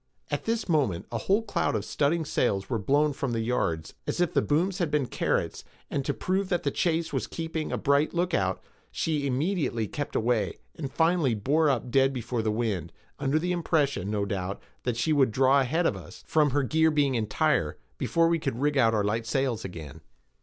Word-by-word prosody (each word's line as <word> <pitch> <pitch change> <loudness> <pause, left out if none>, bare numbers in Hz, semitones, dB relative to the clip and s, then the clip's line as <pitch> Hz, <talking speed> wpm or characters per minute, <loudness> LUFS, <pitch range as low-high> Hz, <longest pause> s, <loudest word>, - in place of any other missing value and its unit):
At - - -2
this 230 0 -1
moment 140 - +1
a 115 - -2
whole 200 - +2
cloud 185 -5 0
of - - -2
studding 160 +3 0
sails 105 -8 0
were 115 - +1
blown 145 +7 +2
from 135 -2 -3
the 115 - 0
yards 85 -9 -1
as - - -2
if 175 -2 +1
the - - +3
booms 180 +6 0
had 170 -4 +1
been 150 -2 +1
carrots; - - -1 0.3
and 140 - -1
to - - +1
prove 190 +1 -1
that 175 - 0
the 140 - 0
chase 165 +1 0
was - - -1
keeping 160 -1 -4
a - - -1
bright 140 +2 +2
lookout, 165 - 0 0.3
she 150 -3 -1
immediately 140 - 0
kept 145 +7 -5
away, 115 -1 +1 0.2
and 140 -4 -6
finally 160 -6 +2
bore 145 +9 +2
up 125 -2 -1
dead 135 +1 +4
before 120 -1 -2
the 110 - 0
wind, 105 -7 -1 0.3
under 140 +1 +1
the 175 +3 -1
impression, 150 - 0
no 105 -1 0
doubt, 100 -1 -3 0.3
that 125 -2 0
she 155 +6 +1
would 140 -4 +4
draw 130 +4 +4
ahead 155 +7 +1
of - - +2
us, - - -11
from 150 -2 +3
her 140 +1 +1
gear 160 +4 +3
being 145 -3 +2
entire, 110 -3 +1 0.2
before 165 0 +2
we 165 0 +2
could 135 -6 -3
rig 145 0 +1
out 115 -2 +4
our 105 - +2
light 115 +3 -1
sails 130 -2 0
again. 80 -4 -8
140 Hz, 205 wpm, -27 LUFS, 115-160 Hz, 0.3 s, dead